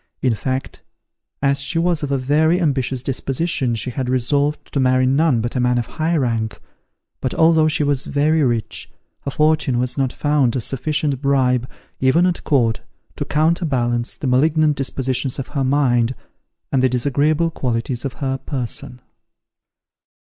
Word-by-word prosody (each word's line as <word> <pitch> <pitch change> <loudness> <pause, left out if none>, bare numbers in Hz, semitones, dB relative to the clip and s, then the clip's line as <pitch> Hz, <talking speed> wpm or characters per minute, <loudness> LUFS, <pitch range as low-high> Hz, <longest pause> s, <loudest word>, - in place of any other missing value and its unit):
In 125 -3 +3
fact, 130 +4 -4 0.6
as 140 0 +2
she 140 +4 -1
was 170 -1 +1
of 145 -2 -3
a 140 - +2
very 155 +6 +2
ambitious 135 -6 0
disposition 135 -1 -1
she 125 +3 -3
had 125 +1 -3
resolved 140 +4 0
to 140 - 0
marry 130 0 +3
none 135 -2 +2
but 120 +3 -4
a - - +1
man 125 0 +2
of 120 - -1
high 160 +6 -1
rank; 115 -5 -1 0.6
but 130 - -2
although 160 -1 +4
she 155 -1 +1
was 140 -2 0
very 155 +3 +2
rich, 120 -5 -1 0.4
her - - -1
fortune 150 -3 +2
was 125 +3 -1
not 130 -2 +1
found 145 -5 +1
a 130 - -1
sufficient 140 +2 -1
bribe, 130 -3 +1 0.3
even 130 +7 +3
at 180 -2 -1
court, 120 -6 +1 0.3
to - - -3
counterbalance 140 -7 0
the - - -7
malignant 150 +4 +3
dispositions 130 -1 -2
of 135 - -5
her 140 -2 -1
mind, 130 -3 +2 0.6
and 135 - +2
the 130 - +3
disagreeable 145 +6 +1
qualities 120 -3 -2
of 135 -3 -3
her 135 -1 -3
person. 125 -2 -3
135 Hz, 160 wpm, -20 LUFS, 125-150 Hz, 0.6 s, although